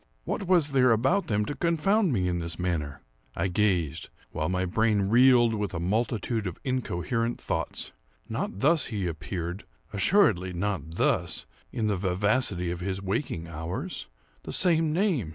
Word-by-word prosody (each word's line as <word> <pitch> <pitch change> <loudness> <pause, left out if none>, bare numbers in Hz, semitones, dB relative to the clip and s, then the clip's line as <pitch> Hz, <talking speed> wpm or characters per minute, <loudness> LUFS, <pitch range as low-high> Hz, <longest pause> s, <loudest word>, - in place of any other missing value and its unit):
What 200 -5 -3
was 170 -5 +3
there 130 -2 +4
about 135 - +2
them 105 -1 +1
to 145 - -3
confound 170 +6 +2
me 95 -7 +1
in 90 -1 -1
this 85 0 -4
manner? 80 -6 -3 0.3
I 95 - 0
gazed;—while 85 -5 -1
my 95 0 0
brain 105 +1 +1
reeled 120 0 +6
with 105 -4 -2
a - - -2
multitude 110 +3 -1
of 90 - -5
incoherent 120 -1 -1
thoughts. - - -3 0.4
Not 95 - -4
thus 150 -1 +3
he 105 -5 -3
appeared—assuredly 90 - 0
not 85 -4 -3
thus—in 110 - -1
the 105 -2 +1
vivacity 95 0 0
of 85 - -4
his 95 +1 -3
waking 95 - -3
hours. 80 +1 -5 0.3
The - - -7
same 165 -4 +3
name! 165 - +1
105 Hz, 145 wpm, -27 LUFS, 90-130 Hz, 0.4 s, reeled